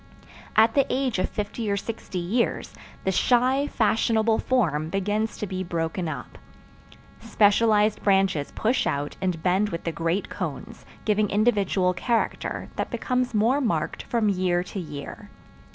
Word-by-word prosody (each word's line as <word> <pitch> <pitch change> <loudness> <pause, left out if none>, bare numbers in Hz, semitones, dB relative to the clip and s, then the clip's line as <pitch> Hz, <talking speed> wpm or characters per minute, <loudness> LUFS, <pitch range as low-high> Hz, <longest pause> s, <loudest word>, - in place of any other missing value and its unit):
At 220 +1 +5
the 275 -1 +3
age 255 -6 0
of 185 - 0
fifty 210 +1 -4
or 200 - +1
sixty 215 -2 -5
years, 195 +8 -1 0.3
the 190 - +1
shy, 255 +7 +2
fashionable 220 -1 +2
form 160 - 0
begins 205 +4 -1
to - - -3
be 185 -1 -4
broken 170 0 -2
up. 140 -5 -7 0.8
Specialized 215 -1 +3
branches 195 -7 +2
push 235 +4 +1
out 145 +1 -2
and 180 -4 -2
bend 190 +3 +2
with 170 -3 -5
the 165 - -2
great 165 +4 -1
cones, - - -6 0.2
giving 210 -1 +2
individual 200 -4 +2
character, 230 +5 -1
that - - -2
becomes 250 -2 -1
more 235 +7 +3
marked 165 - -1
from 230 -3 0
year 180 -3 +1
to 190 +2 -6
year. 150 -5 -8
205 Hz, 145 wpm, -25 LUFS, 180-225 Hz, 0.8 s, At